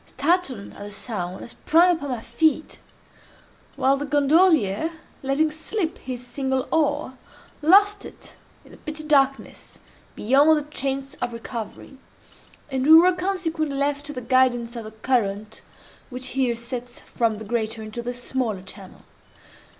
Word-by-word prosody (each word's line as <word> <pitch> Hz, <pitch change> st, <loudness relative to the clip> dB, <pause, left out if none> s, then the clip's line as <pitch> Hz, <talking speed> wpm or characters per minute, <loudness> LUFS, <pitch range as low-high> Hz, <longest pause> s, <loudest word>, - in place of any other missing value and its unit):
Startled 300 Hz, -, -1 dB
at -, -, -14 dB
the 205 Hz, 0 st, -7 dB
sound, 190 Hz, -4 st, -5 dB
I -, -, -8 dB
sprang 345 Hz, +7 st, +3 dB
upon 285 Hz, -3 st, -6 dB
my 245 Hz, -3 st, -3 dB
feet: 315 Hz, +4 st, 0 dB, 1.0 s
while 270 Hz, +1 st, +2 dB
the 290 Hz, -, -4 dB
gondolier, 295 Hz, -, +3 dB, 0.3 s
letting 275 Hz, +3 st, +1 dB
slip 320 Hz, +3 st, -3 dB
his 250 Hz, -1 st, -7 dB
single 265 Hz, +1 st, -2 dB
oar, 290 Hz, -4 st, 0 dB, 0.4 s
lost 405 Hz, +6 st, +5 dB
it -, -, -13 dB, 0.3 s
in -, -, -17 dB
the -, -, -15 dB
pitchy 310 Hz, -1 st, -6 dB
darkness 275 Hz, -3 st, 0 dB, 0.4 s
beyond 285 Hz, +7 st, +4 dB
a -, -, -6 dB
chance 275 Hz, -1 st, -3 dB
of 240 Hz, -, -2 dB
recovery, 230 Hz, +3 st, -7 dB, 0.7 s
and 265 Hz, +1 st, -1 dB
we 315 Hz, -, +10 dB
were 350 Hz, +3 st, +7 dB
consequently 340 Hz, -6 st, -2 dB
left 285 Hz, +1 st, 0 dB
to 295 Hz, -, -5 dB
the 255 Hz, -, -5 dB
guidance 245 Hz, -1 st, +2 dB
of 230 Hz, -2 st, -6 dB
the 215 Hz, -, -8 dB
current 215 Hz, -2 st, -2 dB, 0.5 s
which 255 Hz, 0 st, -6 dB
here 255 Hz, -3 st, 0 dB
sets 240 Hz, +1 st, -7 dB
from 225 Hz, -3 st, -1 dB
the 220 Hz, -, -8 dB
greater 220 Hz, 0 st, -2 dB
into 215 Hz, +2 st, -6 dB
the 245 Hz, +1 st, -4 dB
smaller 245 Hz, -6 st, -3 dB
channel. 190 Hz, 0 st, -12 dB
265 Hz, 150 wpm, -23 LUFS, 235-310 Hz, 1.0 s, we